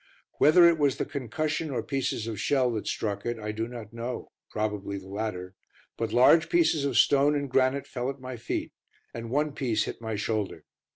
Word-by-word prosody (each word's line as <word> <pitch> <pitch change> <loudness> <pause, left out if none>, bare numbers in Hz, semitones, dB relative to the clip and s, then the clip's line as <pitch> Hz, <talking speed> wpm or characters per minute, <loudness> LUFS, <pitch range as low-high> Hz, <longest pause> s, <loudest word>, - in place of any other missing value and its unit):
Whether 170 +4 +7
it 170 -2 +3
was 140 -3 +2
the - - -1
concussion 155 +4 -3
or 130 - -2
pieces 135 -5 -2
of 110 -3 -5
shell 130 +1 +2
that 110 -2 -4
struck 100 -2 -2
it, 120 0 -2
I 105 -1 -4
do 110 +2 -3
not 115 -3 -9
know 120 +2 -5 0.2
probably 105 -2 -3
the 95 -1 -10
latter 95 -2 -4 0.4
but 115 - -3
large 155 +7 +5
pieces 325 - +3
of 135 -5 0
stone 140 +4 +5
and 140 -1 -1
granite 130 +1 +2
fell 125 0 -3
at 135 0 -6
my 130 0 -6
feet, 115 - -4 0.4
and 115 0 -6
one 145 +3 0
piece 115 -7 0
hit - - -6
my 110 -1 -3
shoulder. 105 -1 -2
120 Hz, 195 wpm, -27 LUFS, 110-140 Hz, 0.4 s, Whether